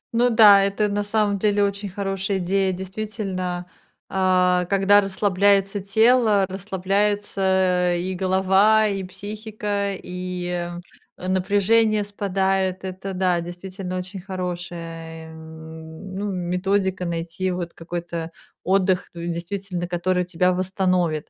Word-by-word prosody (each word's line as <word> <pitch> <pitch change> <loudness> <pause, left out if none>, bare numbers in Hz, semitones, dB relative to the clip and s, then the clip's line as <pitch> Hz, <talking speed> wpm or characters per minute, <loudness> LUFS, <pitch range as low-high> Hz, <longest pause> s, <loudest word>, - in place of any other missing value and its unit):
Ну 245 +1 +4
да, 215 -4 +8
это 200 +1 0
на 205 0 -1
самом 205 -1 0
деле 205 0 +2
очень 200 0 -2
хорошая 195 0 -2
идея. 190 +1 +1
Действительно, 190 -2 -4 0.4
а, 180 -1 +2
когда 200 +1 +5
расслабляется 195 0 +2
тело, 220 0 +4
расслабляется 190 -1 0
и 185 +2 -3
голова, 190 +3 +3
и 195 -2 -2
психика, 205 +1 -4
и 180 -1 -4 0.5
напряжение 205 +4 +2
спадает. 195 -2 -1
Это 190 +1 -5
да, 180 -2 +1
действительно 185 +2 -6
очень 185 +1 -6
хорошая, 170 -3 -6
эм, 160 +2 -10
ну, 200 +2 -3
методика- 185 +1 -1
найти 170 +2 -3
вот 180 -2 -4
какой-то 170 -1 -5 0.3
отдых, 185 0 +1
ну, 170 0 -3
действительно, 180 +1 -4
который 180 +1 0
тебя 180 +1 +1
восстановит. 180 -4 0
190 Hz, 110 wpm, -23 LUFS, 180-200 Hz, 0.5 s, да